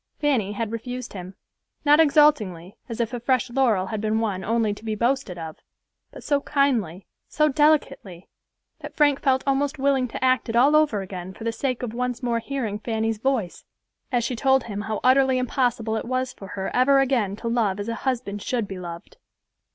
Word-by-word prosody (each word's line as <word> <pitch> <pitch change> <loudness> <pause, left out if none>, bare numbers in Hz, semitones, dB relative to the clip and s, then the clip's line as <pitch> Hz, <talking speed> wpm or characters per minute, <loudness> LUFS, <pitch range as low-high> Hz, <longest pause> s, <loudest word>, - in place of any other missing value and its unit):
Fanny 245 -9 +1
had 225 +1 -3
refused 245 +2 -6
him; 185 -1 -8 0.5
not 295 +1 +6
exultingly, 240 - +3
as 230 - -6
if 235 +1 -1
a 245 - -3
fresh 255 0 0
laurel 235 -7 +2
had 215 +1 -4
been 220 0 0
won 200 -4 -2
only 225 -1 +1
to 205 - -13
be 220 -1 -2
boasted 235 -4 -1
of, 160 -2 -7 0.5
but - - -11
so 285 -2 +1
kindly, 235 - 0 0.2
so 305 0 +2
delicately, 275 - +1 0.5
that - - -9
Frank 290 -2 +3
felt 265 -2 +2
almost 280 +2 0
willing 270 -2 +1
to 240 - -6
act 255 -1 +2
it 225 - -2
all 275 +5 +5
over 300 -10 +3
again 185 -1 -8
for - - -10
the 230 - 0
sake 255 +2 -3
of 230 -3 -4
once 250 +1 -3
more 235 -1 0
hearing 230 -5 -4
Fanny's 225 -1 -2
voice, 230 -8 -1 0.5
as 245 -2 +1
she 245 +2 -2
told 265 +1 +3
him 205 -2 -5
how 215 0 -4
utterly 260 0 +4
impossible 245 -3 0
it 220 - -3
was 255 +1 -2
for 195 - -11
her 190 0 -5
ever 265 +3 +4
again 245 -8 +1
to 230 - -6
love 220 -4 0
as 205 - -4
a 230 - -2
husband 235 -6 -2
should 235 -2 -2
be 195 -2 -7
loved. 170 -1 -9
235 Hz, 200 wpm, -24 LUFS, 210-265 Hz, 0.5 s, not